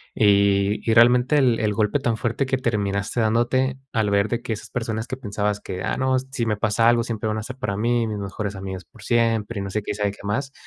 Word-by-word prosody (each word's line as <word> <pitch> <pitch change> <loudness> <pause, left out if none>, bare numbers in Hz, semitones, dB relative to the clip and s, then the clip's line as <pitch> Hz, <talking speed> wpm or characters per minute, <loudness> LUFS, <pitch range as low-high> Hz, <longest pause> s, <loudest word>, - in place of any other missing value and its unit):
Y 100 -1 +3
y, 110 - +4
realmente, 125 +5 +5
el 125 -5 +3
el 105 -1 +1
golpe 110 +6 +1
tan 120 -3 0
fuerte 120 +5 -1
que 130 - +1
terminaste 105 -3 -1
dándote 120 +4 +1 0.2
al 110 -3 +1
ver 100 +1 +2
de 120 0 -1
que 115 - -3
esas 105 - -8
personas 110 -2 -3
que 130 - -5
pensabas 105 -3 -2
que: 95 +1 -5
"Ah, 95 - -1
no, 130 0 +2
si 130 -2 -4
me 105 -1 0
pasa 110 +2 +2
algo, 120 0 +3
siempre 110 -2 -3
van 110 - -1
a 110 - -4
ser 130 +2 -8
para 110 -7 -3
mí, 115 +1 +1
mis 105 -1 -3
mejores 100 +1 -4
amigas 95 -1 -6
por 105 +5 -17
siempre", 115 -2 +1
y - - -3
no 100 - -5
sé 105 +2 -2
qué - - -3
y - - -3
sabe 105 -1 0
qué - - -16
más. 135 +7 -2
110 Hz, 255 wpm, -23 LUFS, 100-120 Hz, 0.2 s, realmente